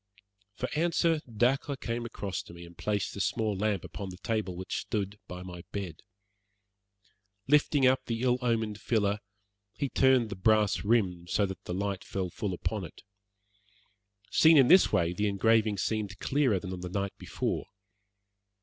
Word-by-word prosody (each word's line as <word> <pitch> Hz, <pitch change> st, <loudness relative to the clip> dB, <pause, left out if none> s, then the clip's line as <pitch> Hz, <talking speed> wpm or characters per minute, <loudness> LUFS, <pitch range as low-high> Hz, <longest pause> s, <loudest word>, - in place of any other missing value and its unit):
For 125 Hz, -, -3 dB
answer 165 Hz, 0 st, +2 dB
Dacre 130 Hz, +5 st, +1 dB
came 120 Hz, -2 st, -4 dB
across 100 Hz, -5 st, -4 dB
to -, -, -13 dB
me, 85 Hz, 0 st, -10 dB
and 85 Hz, 0 st, -14 dB
placed 105 Hz, +3 st, -2 dB
the 100 Hz, -, -4 dB
small 110 Hz, 0 st, 0 dB
lamp 100 Hz, -1 st, 0 dB
upon 100 Hz, -2 st, -6 dB
the 90 Hz, -, -9 dB
table 110 Hz, -4 st, -2 dB
which 95 Hz, +1 st, -4 dB
stood 100 Hz, -1 st, -3 dB
by 90 Hz, 0 st, -7 dB
my 90 Hz, -1 st, -8 dB
bed. 95 Hz, -5 st, -5 dB, 1.5 s
Lifting 145 Hz, -1 st, +4 dB
up 130 Hz, +1 st, +3 dB
the 115 Hz, +1 st, -2 dB
ill 125 Hz, 0 st, +2 dB
omened 110 Hz, -4 st, -1 dB
filler, 105 Hz, -3 st, +1 dB, 0.6 s
he 140 Hz, -, -1 dB
turned 130 Hz, -4 st, +3 dB
the -, -, -3 dB
brass 105 Hz, +1 st, +2 dB
rim 95 Hz, -6 st, +1 dB
so 100 Hz, +3 st, +2 dB
that 95 Hz, -1 st, -7 dB
the 90 Hz, -, -3 dB
light 100 Hz, 0 st, -2 dB
fell 95 Hz, -2 st, -3 dB
full 95 Hz, 0 st, -3 dB
upon 105 Hz, +3 st, -3 dB
it. 85 Hz, -, -11 dB, 1.3 s
Seen 160 Hz, 0 st, +6 dB
in 135 Hz, -3 st, +6 dB
this 185 Hz, -, +7 dB
way 85 Hz, 0 st, +2 dB
the 105 Hz, +4 st, 0 dB
engraving 105 Hz, +1 st, +2 dB
seemed 105 Hz, +1 st, -2 dB
clearer 130 Hz, -8 st, +1 dB
than 95 Hz, 0 st, -6 dB
on 90 Hz, -, -6 dB
the 90 Hz, -, -5 dB
night 100 Hz, +1 st, -2 dB
before. -, -, -3 dB
105 Hz, 170 wpm, -29 LUFS, 95-120 Hz, 1.5 s, this